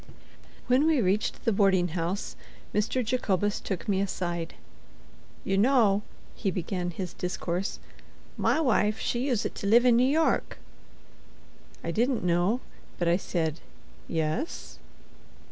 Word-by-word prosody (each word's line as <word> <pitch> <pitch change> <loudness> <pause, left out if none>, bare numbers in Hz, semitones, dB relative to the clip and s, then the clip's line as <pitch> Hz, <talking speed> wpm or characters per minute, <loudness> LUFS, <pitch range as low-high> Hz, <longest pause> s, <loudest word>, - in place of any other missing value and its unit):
When 260 +5 +3
we 315 -4 +3
reached 200 0 0
the 230 - +3
boarding 195 -3 +3
house, 175 +4 -3 0.4
Mr. 220 +4 0
Jacobus 205 -4 0
took 190 -4 -5
me 195 -2 +2
aside. 175 -3 -3 0.9
"You 195 0 +1
know," 220 -4 +4 0.3
he 195 - -2
began 180 0 -2
his 175 +1 -5
discourse, 180 +1 -3 0.6
"my - - +2
wife 220 -7 +2
she 245 +4 -1
uset 240 -5 0
to 200 - -4
live 235 +4 +6
in 240 -1 +5
N' 255 - +4
York!" 315 +2 +1 1.3
I 170 - -2
didn't 240 +5 +1
know, 180 +7 +2 0.4
but 175 - -1
I 170 +1 +4
said 165 -4 -2 0.5
"Yes." 160 - -3
200 Hz, 130 wpm, -28 LUFS, 175-240 Hz, 1.3 s, live